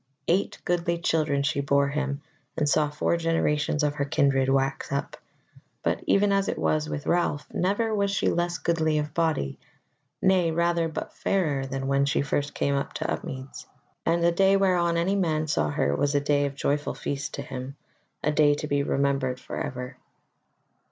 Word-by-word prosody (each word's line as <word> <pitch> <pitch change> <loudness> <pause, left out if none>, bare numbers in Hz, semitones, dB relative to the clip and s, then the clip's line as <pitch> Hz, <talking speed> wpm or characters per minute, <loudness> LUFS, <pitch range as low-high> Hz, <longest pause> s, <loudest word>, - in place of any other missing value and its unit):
Eight 185 +4 +1
goodly 170 -1 0
children 155 -4 +1
she 140 0 0
bore 140 0 +2
him, 140 0 -2 0.3
and 150 - +1
saw 150 0 +3
four 150 +3 0
generations 155 -2 +1
of 145 -1 +1
her 140 -1 -1
kindred 135 -1 +2
wax 135 0 0
up; 140 0 -2 0.7
but - - 0
even 200 0 +4
as 195 0 +2
it - - -2
was 155 0 0
with 145 - -4
Ralph, 170 -4 +1
never 205 +5 0
was 200 -1 +1
she 195 - 0
less 175 0 0
goodly 160 -3 +1
of 150 -1 -2
body, 160 - 0 0.6
nay 185 -3 +3
rather, 170 0 +1
but 160 - -6
fairer 150 -9 0
than 135 0 -4
when 140 +1 +2
first 145 +1 0
she - - -22
came 140 -1 +1
to - - -2
Upmeads; 130 +1 -6 0.4
and 170 +1 +1
the 170 - +5
day 195 +3 +4
whereon 175 -3 +2
any 180 +4 +1
man 160 -5 +1
saw 140 - 0
her 70 0 0
was 145 - 0
a - - +5
day 145 0 +1
of 140 - -7
joyful 145 +1 -1
feast 140 +1 -4
to - - -5
him, 130 +1 -7 0.5
a 150 - +2
day 150 -1 +4
to 150 - -4
be 145 -1 +1
remembered 135 -2 0
for - - -8
ever. 125 0 -5
150 Hz, 180 wpm, -26 LUFS, 140-170 Hz, 0.7 s, the